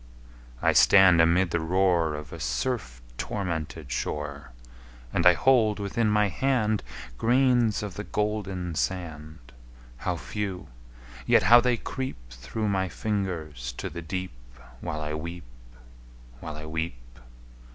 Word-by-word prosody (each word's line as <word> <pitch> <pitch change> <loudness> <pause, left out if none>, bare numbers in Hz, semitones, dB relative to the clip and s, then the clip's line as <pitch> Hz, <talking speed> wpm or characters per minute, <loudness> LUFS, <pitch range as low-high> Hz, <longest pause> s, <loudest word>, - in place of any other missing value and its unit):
I - - +4
stand 95 -4 +7
amid 85 +2 +3
the 85 - +1
roar 85 -2 +2
Of 75 -2 -8
a - - -7
surf 60 - -3 0.2
tormented 80 -7 -4
shore, 70 0 -4 0.6
And 90 0 +4
I 90 - +9
hold 110 0 +3
within 105 +2 0
my 105 0 +3
hand 110 +1 +1 0.4
Grains 120 -3 +3
of 105 -3 -5
the 105 - -6
golden 100 -5 -2
sand 75 -2 -4 0.5
How - - -2
few! 100 -3 -5 0.6
yet - - +5
how 120 +1 +8
they 125 -1 +1
creep 130 - -5
Through 65 - -4
my 95 -2 0
fingers 80 - -3
to - - -4
the 85 +2 -6
deep 90 +3 -4 0.5
While 75 +3 -4
I 75 0 -3
weep 85 +3 -6 1.0
while 80 +1 -7
I 75 0 -8
weep! 75 -7 -5
90 Hz, 130 wpm, -27 LUFS, 75-105 Hz, 1.0 s, I